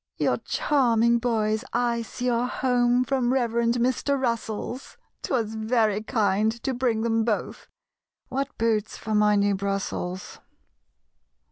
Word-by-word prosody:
"Your - - +1
charming 235 -5 +2
boys 220 -2 0
I 235 0 +1
see 245 +2 -5
are 240 0 +1
home 245 -1 +2
From 255 -1 0
Reverend 235 -2 +1
Mr. 255 +3 0
Russell's; 235 0 -3 0.2
'Twas 225 -5 -1
very 220 -2 +1
kind 215 -1 +1
to 265 - -1
bring 240 -3 0
them 225 -1 +1
both 220 -2 -3 0.6
(What 275 +2 -3
boots 220 -2 0
for 220 - -4
my 210 0 +4
new 200 0 +2
Brussels!) 195 -2 -3
230 Hz, 125 wpm, -25 LUFS, 215-245 Hz, 0.6 s, my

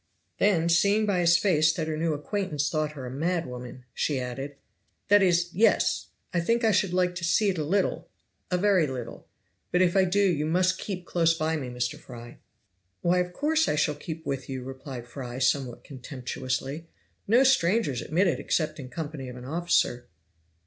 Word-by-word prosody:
Then, 180 -5 +3
seeing 200 +6 +3
by 200 -3 +1
his 170 -1 +5
face 160 -4 +3
that 160 -1 -3
her 155 - -2
new 160 0 0
acquaintance 150 -2 -2
thought 155 -1 -1
her 135 -4 -7
a 125 - -6
madwoman, 130 -5 -3
she 145 -3 -1
added: 135 +3 -5 0.5
"That 205 0 +6
is, 175 -2 +2
yes! 220 +6 +2 0.3
I 175 - +2
think 230 +8 +1
I 220 - +4
should 195 -2 +2
like 180 0 +1
to 175 -1 -6
see 200 +5 +3
it 185 -4 -1
a - - 0
little 190 +6 0 0.4
a 180 - +1
very 190 -4 +3
little 125 -3 -7 0.4
but 180 - +2
if 175 0 +1
I 190 -1 +5
do 190 +3 +1
you 155 -4 0
must 185 +3 +2
keep 180 -3 -5
close 165 -1 +2
by 160 0 0
me, 135 -5 -4
Mr. 125 0 -3
Fry." 120 -1 -11 0.6
"Why 180 +1 +2
of 180 0 -1
course 310 - +1
I - - +1
shall 150 0 +1
keep 160 +2 -7
with 135 -1 -4
you," 130 -1 -4
replied 130 -1 -8
Fry 125 0 -7
somewhat 130 -1 0
contemptuously. 130 +3 -5 0.4
"No 235 +6 +5
strangers 185 - +2
admitted 175 +3 +1
except 155 -2 -1
in 130 -2 -8
company 150 -3 -6
of 125 - -8
an 125 0 -9
officer." 155 -5 0
160 Hz, 185 wpm, -27 LUFS, 135-180 Hz, 0.6 s, That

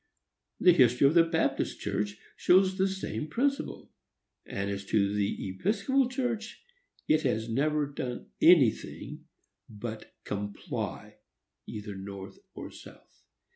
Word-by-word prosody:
The 180 - +7
history 125 -3 +5
of 140 - +5
the 170 - +7
Baptist 160 -5 0
Church 105 +1 -2 0.2
shows 185 +1 +4
the 190 - +4
same 190 -5 -4
principle; 275 - -2 0.6
and, 100 0 -3
as 100 0 -4
to 100 0 +2
the 100 -1 -1
Episcopal 240 - +1
Church, 240 -4 -3 0.4
it 155 0 +4
has 110 -6 0
never 145 +5 +1
done 130 -3 -6
anything 160 -10 +3 0.4
but 110 +1 -7
comply, 100 0 -5 0.5
either 105 -2 -6
North 95 0 -8 0.2
or - - -7
South. - - -15
130 Hz, 120 wpm, -29 LUFS, -, 0.6 s, The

